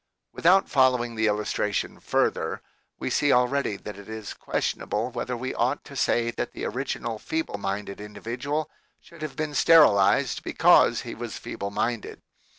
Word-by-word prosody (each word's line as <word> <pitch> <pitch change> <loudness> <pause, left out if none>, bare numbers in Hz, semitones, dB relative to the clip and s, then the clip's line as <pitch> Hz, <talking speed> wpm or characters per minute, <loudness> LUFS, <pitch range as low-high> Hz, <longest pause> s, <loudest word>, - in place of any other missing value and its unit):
Without 190 +3 +4
following 125 -3 +2
the 110 -1 +1
illustration 105 -1 -1
further, - - 0 0.3
we - - -3
see 145 -1 +2
already 125 -2 +2
that 105 0 -9
it 100 - -12
is 110 -1 -6
questionable 115 +4 -2
whether 125 0 -3
we 130 +2 -4
ought 125 +5 0
to 140 - -12
say 120 -3 +1
that - - -4
the - - -5
original 115 -2 -3
feeble 160 -9 -3
minded 100 0 -4
individual 125 +8 -4 0.3
should 170 -2 -16
have 155 -2 -5
been 155 -1 -3
sterilized 125 -7 +5
because - - +4
he - - -7
was - - -6
feeble 100 - -5
minded. 115 +2 -3
120 Hz, 155 wpm, -26 LUFS, 105-140 Hz, 0.3 s, sterilized